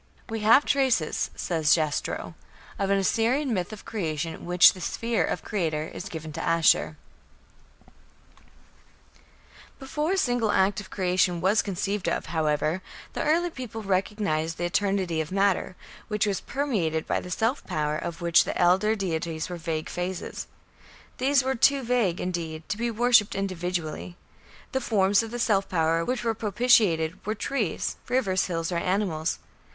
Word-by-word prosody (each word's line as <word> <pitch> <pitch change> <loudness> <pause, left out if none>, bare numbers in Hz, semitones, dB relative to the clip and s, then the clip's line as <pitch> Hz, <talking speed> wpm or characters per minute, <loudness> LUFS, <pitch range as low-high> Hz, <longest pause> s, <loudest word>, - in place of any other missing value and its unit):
"We 225 0 -3
have 225 +7 +5
traces", 260 - +1
says 160 -3 +2
Jastrow, 155 -3 -2 0.5
"of 195 -1 0
an 200 - +3
Assyrian 235 +7 +1
myth 180 -2 -2
of 215 - -10
Creation 165 -6 -3
in - - -10
which 180 0 +7
the 185 - -10
sphere 230 +5 -1
of - - -2
creator 160 -7 -2
is 190 - -7
given 160 -3 -7
to - - -4
Ashur." 165 -2 +3 2.8
Before 300 +5 -2
a - - 0
single 245 - +1
act 195 +1 +2
of 190 - -13
creation 180 -2 +1
was 190 +5 +3
conceived 195 -1 -2
of, - - -2
however, 155 +2 0 0.3
the - - -3
early 340 +3 +2
peoples 230 -6 -7
recognized 185 -4 -1
the 175 - -2
eternity 185 -3 0
of 155 - -6
matter, 195 -1 +1 0.3
which 210 -2 0
was 200 -2 -1
permeated 200 - -1
by - - 0
the 180 - -9
"self 225 +9 0
power" 150 0 -1
of 165 +2 -5
which 170 -1 +5
the - - -4
elder 190 +5 +4
deities 165 -5 -3
were 175 - -4
vague 160 -1 -3
phases. 180 +1 -4 0.7
These 270 +1 +3
were 265 +1 0
too 270 +2 +3
vague, 230 -8 +1
indeed, 165 -3 -4
to 205 - -2
be 235 0 0
worshipped 235 -2 +3
individually. 180 -3 -3 0.5
The 265 - -1
forms 200 -3 +3
of 225 - -6
the 240 - -5
"self 200 -5 +1
power" 165 -1 +1
which 250 +7 -2
were 230 -1 +1
propitiated 210 -7 +2
were 215 +2 -2
trees, 225 -4 -2
rivers, 215 -8 +1
hills, 165 -1 -2
or 175 - 0
animals. 180 -3 -1
190 Hz, 155 wpm, -26 LUFS, 165-225 Hz, 2.8 s, which